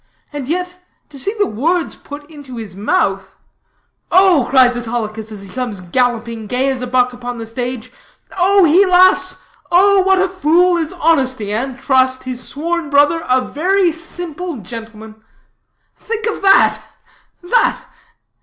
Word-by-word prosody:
And 285 -3 -5
yet, 360 +3 -3 0.3
see 280 +7 -1
the 410 - +2
words 330 - -1
put 290 0 -11
into 285 -5 -11
his 215 -5 -8
mouth: 195 -1 -1 0.8
'Oh,' 365 -8 +5
cries 255 -2 +4
Autolycus, 225 -2 -5
as 205 -2 -9
he 195 - -11
comes 240 -5 -4
galloping, 230 +3 -2
gay 260 +4 0
as 260 -1 -4
a 250 - -4
buck, 250 0 +1
upon 245 0 -7
the 225 - -6
stage, 245 +1 -5 0.4
'oh,' 385 +2 +4
he 345 +4 +5
laughs, 370 0 +4 0.3
'oh 390 +3 +5
what 385 0 +3
a 380 - +2
fool 355 0 +2
is 330 -2 -2
Honesty, 260 - 0
and 250 +3 -3
Trust, 260 -1 +1
his 255 -1 -5
sworn 330 +3 -3
brother, 290 +3 +3
a 255 0 +3
very 360 +7 +1
simple 335 +1 -7
gentleman.' 220 +1 -10 0.8
Think 450 -1 -4
of 450 - -3
that. 390 0 +4
270 Hz, 145 wpm, -16 LUFS, 240-355 Hz, 0.8 s, Oh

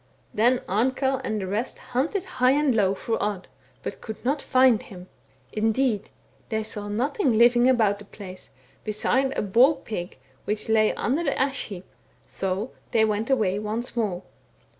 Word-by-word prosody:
Then 240 +4 +3
Amkell 260 +6 +1
and 215 -4 -2
the 190 - -3
rest 210 +6 -2 0.2
hunted 330 +10 0
high 255 -8 +2
and 290 -2 +2
low 200 -3 +2
for 225 +3 -2
Odd, 205 -2 -2 0.4
but - - -6
could 220 +1 -8
not 280 +2 +1
find 255 -3 +4
him; 185 -8 -11 0.5
indeed 220 0 +1 0.4
they 220 -1 -1
saw 210 -1 -5
nothing 250 - 0
living 240 +2 +5
about 215 -5 +3
the 205 - -12
place, 190 -2 -10 0.3
beside 250 +5 +1
a - - 0
boar 240 +9 +5
pig 210 -9 -6 0.3
which 210 +1 -2
lay 220 -1 +4
under 290 +7 0
the 280 - 0
ash 270 +1 0
heap, 190 -3 -8 0.4
so 195 +5 -3 0.2
they 225 -2 +3
went 215 +2 -1
away 210 -7 +2
once 220 +4 -3
more. 200 -6 -1
225 Hz, 160 wpm, -25 LUFS, 205-260 Hz, 0.5 s, living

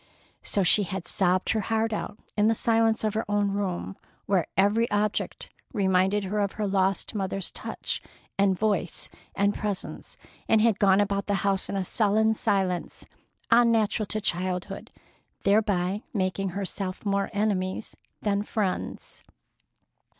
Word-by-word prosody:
So 200 - +2
she 195 +3 +6
had 190 -3 -4
sobbed 185 -1 +2
her 220 - +1
heart 225 +2 0
out 210 - -4 0.2
in 210 0 +3
the 225 - +3
silence 225 0 +2
of 215 -1 0
her 220 - 0
own 205 -1 +1
room, 195 -2 -3 0.3
where 190 -4 +1
every 210 +4 +3
object 210 0 -1 0.2
reminded 190 -1 +2
her 200 +2 -2
of 200 -1 -1
the 215 - 0
lost 195 -1 0
mother's 195 -2 -3
touch - - -4 0.3
and 195 -1 +2
voice 205 -5 -1 0.3
and 200 +1 +2
presence, 205 -3 -5 0.3
and 220 - +4
had 220 -2 +3
gone 195 0 +5
about 200 0 -1
the 205 - +1
house 195 -1 +2
in 200 - -2
a 190 - -1
sullen 220 +2 +2
silence 195 -5 -1 0.5
unnatural 230 -2 +4
to 215 - -2
childhood, 180 -2 -2 0.5
thereby 200 -1 +2
making 190 0 0
herself 195 0 -4
more 200 -1 0
enemies 205 -2 -1 0.3
than 205 -1 +1
friends. 205 -3 -3
200 Hz, 145 wpm, -27 LUFS, 190-215 Hz, 0.5 s, she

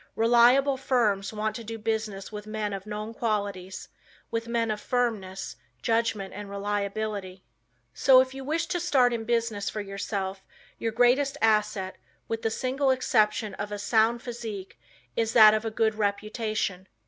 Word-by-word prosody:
Reliable 245 +4 +5
firms 220 -7 +1
want 215 0 -2
to 230 - -8
do 225 +1 -6
business 220 -3 -3
with 210 0 -7
men 215 -1 -3
of 195 +1 -6
known 210 +1 -5
qualities, 200 -5 -3 0.4
with 230 0 -2
men 230 -1 0
of 210 -1 -4
firmness, 195 - -2 0.3
judgment 225 -4 0
and 205 0 -7
reliability. 200 -1 -3 0.5
So 265 -1 +6
if 260 0 +1
you 270 0 -7
wish 320 +4 -1
to 350 +1 -2
start 265 -8 +3
in 225 -1 -3
business 230 -3 0
for 215 - -5
yourself 195 -1 -4 0.4
your 225 - -1
greatest 245 +4 +3
asset, 210 -3 +1 0.3
with 225 0 -3
the 225 - 0
single 265 +4 0
exception 215 -5 +2
of 205 +1 -4
a 205 - -3
sound 225 +3 +2
physique, 220 - -7 0.4
is 225 0 0
that 215 -3 +9
of 215 +1 -1
a - - 0
good 220 0 +1
reputation. 210 -2 -2
220 Hz, 160 wpm, -27 LUFS, 205-235 Hz, 0.5 s, that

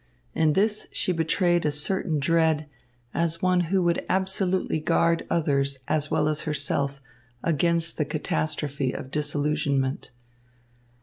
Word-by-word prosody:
In 155 -2 +3
this 210 +3 +1
she - - -1
betrayed 175 +1 +1
a 150 - +1
certain 155 +2 0
dread, 160 +1 +2 0.5
as 170 0 -1
one 185 -1 +3
who 190 -1 +2
would 170 -1 +1
absolutely 190 -2 0
guard 165 +1 +1
others 140 -4 +1
as 150 -1 0
well 155 -1 +1
as 155 0 0
herself 140 -2 -1 0.4
against 170 +1 +1
the 150 - +2
catastrophe 150 -2 -2
of 130 - -7
disillusionment. 145 -2 -1
155 Hz, 125 wpm, -26 LUFS, 145-170 Hz, 0.5 s, In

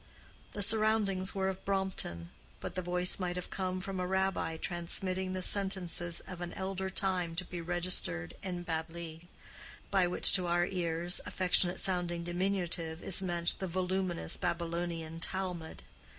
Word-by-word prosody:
The 205 - +1
surroundings 210 -3 +2
were 190 -1 0
of 190 -1 -4
Brompton, 190 - -2 0.3
but - - -6
the 185 - -2
voice 180 +1 +5
might 180 -1 -2
have 180 - -6
come 185 -1 -2
from 195 0 -4
a 180 - -1
Rabbi 190 -4 0
transmitting 185 +2 0
the 185 -1 -3
sentences 180 -4 +1
of 180 -2 -9
an 175 - -5
elder 190 0 -3
time 185 -3 -1
to 180 +2 -1
be 175 -1 -6
registered 170 - -1
in 180 -2 -4
Babli—by 170 +3 -4
which 180 - +6
(to 180 -2 +5
our 175 0 +2
ears) 175 -1 +1
affectionate 180 -1 +2
sounding 175 -2 -1
diminutive 175 -2 -2
is 190 - +6
meant 175 -2 +1
the 190 - -2
voluminous 185 0 0
Babylonian 170 -1 -3
Talmud. 180 -3 -3
180 Hz, 145 wpm, -32 LUFS, 170-190 Hz, 0.3 s, which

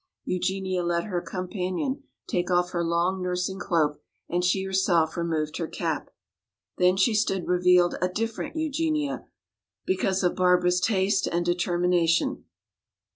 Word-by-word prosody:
Eugenia 185 0 -1
let 170 0 0
her 180 -5 -2
companion 185 +10 -3 0.2
take 175 -1 -1
off 180 0 +2
her 170 -1 -1
long 170 +3 0
nursing 180 +1 -2
cloak 155 -6 0 0.3
and 175 +1 -1
she 190 +2 +2
herself 185 -4 +1
removed 160 -2 -2
her 165 - -2
cap. - - -3 0.7
Then 180 +1 +4
she 205 +4 +3
stood 200 -4 0
revealed 180 0 +4
a 180 - +3
different 225 - -3
Eugenia, 310 -1 -1 0.6
because 190 0 0
of 180 - +2
Barbara's 180 0 +3
taste 195 -1 +2
and 175 0 -1
determination. 175 -1 +1
180 Hz, 130 wpm, -26 LUFS, 175-190 Hz, 0.7 s, Then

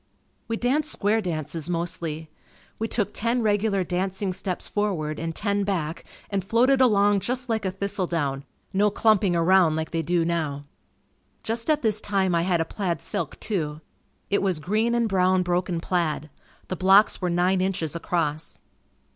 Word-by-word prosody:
We 225 - -2
danced 290 +6 0
square 215 +2 +1
dances 165 -2 -4
mostly. 165 -2 -3 0.5
We 225 - -1
took 210 -3 -1
ten 235 +2 0
regular 205 -2 +1
dancing 185 +2 -2
steps 185 -1 -4
forward 170 -8 -2
and 165 0 -4
ten 200 -1 0
back 170 -5 -2 0.3
and 195 -2 0
floated 250 +6 +3
along 205 -4 +4
just 250 +5 -2
like 220 -2 -1
a 190 - 0
thistledown 175 -8 -2 0.3
no 205 +2 +3
clumping 205 -3 +3
around 170 -1 +4
like 160 0 -3
they 165 - 0
do 170 +1 +1
now. 155 -4 -2 0.8
Just 230 +5 -1
at 305 -2 +2
this 215 -1 +1
time, 195 -3 +1
I 170 - +3
had 175 -1 +1
a 165 - +1
plaid 175 -5 -2
silk 200 +8 -4
too. 155 -8 -2 0.5
It 200 - +3
was 190 -5 0
green 215 +9 +1
and 235 -1 +2
brown 185 -2 +2
broken 180 -1 -1
plaid. 165 -4 -1 0.4
The 185 - -3
blocks 195 +3 +4
were 180 - 0
nine 180 +2 +2
inches 180 -5 -1
across. 160 -2 -2
190 Hz, 165 wpm, -25 LUFS, 170-210 Hz, 0.8 s, along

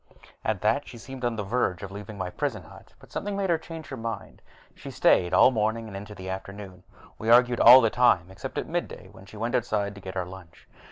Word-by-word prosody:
At 110 -4 -1
that, 115 +7 +1
she 120 - -10
seemed 130 +2 -10
on 120 -1 0
the 105 - -3
verge 100 -4 -1
of 95 - -7
leaving 105 +1 -8
my 95 -2 -4
prison - - -3
hut, - - -16
but - - -19
something 200 0 -3
made 195 -3 0
her 165 - +2
change 160 0 -9
her 135 - -6
mind. 115 -3 -6 0.3
She - - -10
stayed 90 -1 +3
all 90 +7 +6
morning 110 0 0
and 105 -3 -9
on 95 - -5
into 105 0 -10
the 95 -1 -9
afternoon. 95 -1 -7 0.4
We 110 - -3
argued 120 0 +5
all 125 +3 +10
the 115 -2 +2
time, 95 -8 +3
except 95 +1 -8
at - - -1
midday, - - -5
when 95 - -15
she 110 - -12
went 115 +3 -3
outside 105 -4 0
to 100 - -12
get 95 0 -7
our 90 - -1
lunch. 90 -2 -13
110 Hz, 240 wpm, -26 LUFS, 95-120 Hz, 0.4 s, all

